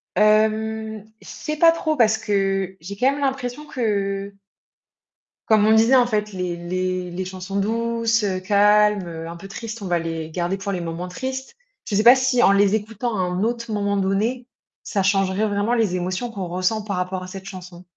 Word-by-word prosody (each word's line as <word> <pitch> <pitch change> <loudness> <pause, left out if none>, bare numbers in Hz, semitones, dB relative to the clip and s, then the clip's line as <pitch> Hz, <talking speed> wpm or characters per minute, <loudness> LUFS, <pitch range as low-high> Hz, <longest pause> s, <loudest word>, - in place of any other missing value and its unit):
Hem, 220 +1 +1 0.2
je - - -15
sais 305 -1 -5
pas 330 +1 +7
trop, 315 -2 -1
parce 220 -2 +4
que 195 -2 -1
j'ai 200 +5 -8
quand 255 +4 +3
même 280 - -4
l'impression 270 +1 -2
que 200 -6 -2 1.1
comme 215 -2 +4
on 220 - +5
disait, 225 +4 +5
en 250 -2 +5
fait, 210 -2 -1
les 180 -2 -3
les 185 +1 -3
les 185 +2 -4
chansons 190 +1 -4
douces, 230 +1 0
heu, 190 -2 -1
calmes, 210 +1 +3
heu, 165 -1 -7
un 170 - -7
peu 180 +3 -10
tristes, 225 +2 -7
on 195 - -5
va 175 -1 +1
les 165 -1 -4
garder 175 +3 -2
pour 200 +1 -4
les 185 - -2
moments 170 +2 -5
tristes. 260 - -5 0.3
Je 205 - -2
sais 210 - +3
pas 240 +3 +9
si 255 -1 +2
en 200 - +6
les 200 +1 +4
écoutant 220 +1 -3
à - - -2
un 180 +1 -1
autre 235 0 -2
moment 200 -1 0
donné, 215 +6 -1 0.4
ça 195 - -1
changerait 195 +1 +1
vraiment 205 +3 0
les 220 -6 +1
émotions 185 +7 -3
qu'on 195 -5 -5
ressent 185 +5 -1
par 205 -2 -3
rapport 185 +1 -3
à - - -8
cette 190 +1 -8
chanson. 180 -2 -10
205 Hz, 200 wpm, -22 LUFS, 185-225 Hz, 1.1 s, pas